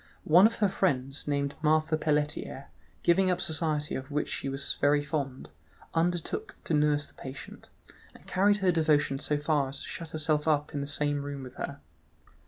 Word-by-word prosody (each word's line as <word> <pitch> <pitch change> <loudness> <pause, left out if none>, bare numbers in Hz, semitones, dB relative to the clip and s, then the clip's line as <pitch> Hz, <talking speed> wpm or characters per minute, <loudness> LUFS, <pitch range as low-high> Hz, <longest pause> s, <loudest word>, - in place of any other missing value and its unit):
One 180 +6 +7
of 230 - -4
her 210 - +2
friends, 135 -8 -1
named 140 -1 0
Marthe 155 0 +2
Pelletier, 150 -2 -1 0.3
giving 185 +2 +4
up 180 -1 +1
society, 155 -2 0
of 130 +1 -5
which 150 0 -1
she 135 - -2
was 135 +1 -2
very 145 0 +4
fond, 140 -3 -4 0.4
undertook 175 - -1
to - - -2
nurse 150 -1 +3
the - - -14
patient, 135 0 -9 0.5
and - - -17
carried 205 +2 +3
her 180 - +5
devotion 150 -4 +2
so 150 0 0
far 145 -2 +1
as 140 +1 -4
to - - -6
shut 165 -1 -6
herself 155 -1 0
up 150 -1 +1
in 145 - -2
the 140 - -4
same 145 0 0
room 140 -1 -6
with 125 -1 -11
her. 140 - -5
150 Hz, 185 wpm, -29 LUFS, 140-165 Hz, 0.5 s, One